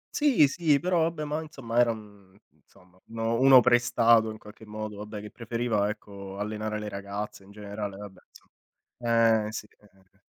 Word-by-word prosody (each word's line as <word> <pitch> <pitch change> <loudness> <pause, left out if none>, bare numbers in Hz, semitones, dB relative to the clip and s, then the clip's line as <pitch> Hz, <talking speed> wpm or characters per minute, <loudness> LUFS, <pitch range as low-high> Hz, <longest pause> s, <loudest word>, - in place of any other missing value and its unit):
Sì 275 - +4
sì, 150 -1 +2
però 175 -2 +2
vabbè 160 -2 -4
ma 150 +2 -2
insomma 135 -7 -3
era 120 -1 +5
un 105 -3 -9
insomma 90 0 -25
uno 115 +1 -2
uno 130 -1 +8
prestato 120 -2 +4
in 110 - -7
qualche 105 +1 -15
modo, 105 -1 -7
vabbè 105 0 -7
che 105 - -10
preferiva 115 -3 -1
ecco 100 -2 -8
allenare 110 +1 -3
le 105 0 -5
ragazze 100 0 -6
in 100 - -18
generale 100 -1 -6
vabbè, 100 -2 -10
insom - - -20 1.0
Eh 110 - -6
sì, 105 - -6
eh, 105 - -23
eh, 95 - -26
eh. 95 - -32
110 Hz, 180 wpm, -27 LUFS, 105-120 Hz, 1.0 s, uno